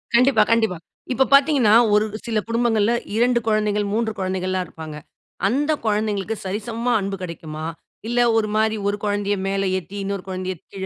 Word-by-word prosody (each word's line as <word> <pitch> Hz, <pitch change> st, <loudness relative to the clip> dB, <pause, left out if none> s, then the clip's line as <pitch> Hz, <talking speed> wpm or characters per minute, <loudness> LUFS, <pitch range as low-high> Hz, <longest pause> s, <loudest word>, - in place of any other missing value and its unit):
கண்டிப்பா, 245 Hz, -2 st, +5 dB
கண்டிப்பா. 220 Hz, -6 st, +2 dB, 0.4 s
இப்ப 265 Hz, +1 st, +3 dB
பார்த்தீங்கன்னா, 275 Hz, -6 st, +5 dB, 0.2 s
ஒரு 210 Hz, +1 st, +4 dB, 0.2 s
சில 225 Hz, -2 st, 0 dB
குடும்பங்கள்ல 230 Hz, -1 st, +2 dB, 0.2 s
2 240 Hz, +1 st, +3 dB
குழந்தைகள், 210 Hz, -1 st, +1 dB
3 225 Hz, 0 st, 0 dB
குழந்தைகள்ல்லாம் 185 Hz, 0 st, -1 dB
இருப்பாங்க. 155 Hz, -2 st, -9 dB, 0.5 s
அந்த 290 Hz, +7 st, +1 dB
குழந்தைங்களுக்கு 210 Hz, 0 st, -1 dB
சரிசமமா 225 Hz, +5 st, -2 dB
அன்பு 195 Hz, 0 st, -3 dB
கெடைக்குமா? 160 Hz, -3 st, -6 dB, 0.4 s
இல்ல 240 Hz, 0 st, +1 dB, 0.2 s
ஒரு 215 Hz, -1 st, +1 dB
மாரி 220 Hz, 0 st, +2 dB
ஒரு 205 Hz, -, -2 dB
குழந்தையை 205 Hz, 0 st, 0 dB
மேல 195 Hz, 0 st, 0 dB, 0.2 s
ஏத்தி, 195 Hz, +3 st, -10 dB
இன்னொரு 195 Hz, -1 st, -4 dB
குழந்தையை 185 Hz, -1 st, -4 dB, 0.2 s
கீழ 190 Hz, -1 st, -5 dB
210 Hz, 150 wpm, -22 LUFS, 190-230 Hz, 0.5 s, கண்டிப்பா